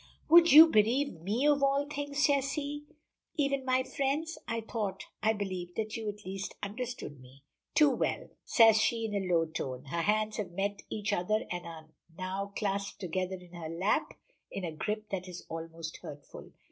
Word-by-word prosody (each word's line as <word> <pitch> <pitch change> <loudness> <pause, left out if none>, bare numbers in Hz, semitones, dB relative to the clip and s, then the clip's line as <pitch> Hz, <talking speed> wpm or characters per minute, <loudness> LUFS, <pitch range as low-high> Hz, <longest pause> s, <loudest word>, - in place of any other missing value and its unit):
"Would 340 0 +8
you 310 +4 +12
bereave 230 - +2
me 215 - 0
of 290 -1 +4
all 275 +1 +3
things," 285 0 -1
says 275 -1 +2
he, 295 0 -4 0.5
"even 275 -3 0
my 260 0 +2
friends? 280 +5 -2
I 230 0 -2
thought 215 -3 -3 0.2
I 220 - +3
believed, 185 -4 -5
that 215 -1 -3
you 220 -2 -3
at 205 0 -8
least 195 +1 -5
understood 215 - -5
me." 130 +2 -17 0.3
"Too 300 -2 +6
well!" 255 - -1
says 225 -2 +6
she 230 0 +1
in 215 - -4
a 190 -3 -1
low 165 -1 +4
tone. 135 -4 -5
Her 170 - 0
hands 215 +3 +1
have 185 -5 -4
met 200 +2 -2
each 210 -1 -2
other 210 +4 0
and 175 -1 -4
are 160 -1 -10 0.3
now 190 +2 -3
clasped 200 -1 -2
together 185 0 -2
in 180 -1 -14
her 165 -2 -6
lap 185 - 0 0.3
in 195 - -5
a 170 - -2
grip 210 +7 -4
that 185 -1 -3
is 180 -1 -9
almost 165 0 -6
hurtful. 145 -1 -11
210 Hz, 185 wpm, -31 LUFS, 180-260 Hz, 0.5 s, you